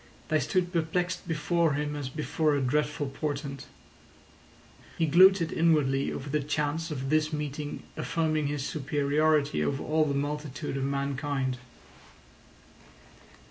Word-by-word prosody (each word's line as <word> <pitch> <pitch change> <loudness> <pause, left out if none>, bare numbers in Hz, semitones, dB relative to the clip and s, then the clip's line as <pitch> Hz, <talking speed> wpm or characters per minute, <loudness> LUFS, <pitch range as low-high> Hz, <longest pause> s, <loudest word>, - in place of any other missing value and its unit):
They 155 - +3
stood 180 +6 0
perplexed 175 +2 -1
before 165 0 +1
him 150 +1 -2
as 145 -2 -4
if 130 - -10
before 150 +1 +1
a - - +1
dreadful 150 +3 0
portent. 140 0 -4 1.3
He 165 - +2
gloated 175 +2 +6
inwardly 150 -5 +2
over 135 - -5
the 150 +2 0
chance 150 +3 -1
of 135 -2 -4
this 155 0 +2
meeting 150 -1 -4
affirming 155 -2 0
his 145 -1 -2
superiority 145 - +1
over 140 - -1
all 155 0 +2
the 140 -2 -1
multitude 145 -1 -3
of 135 -1 -1
mankind. 140 -1 -1
150 Hz, 130 wpm, -28 LUFS, 140-155 Hz, 1.3 s, gloated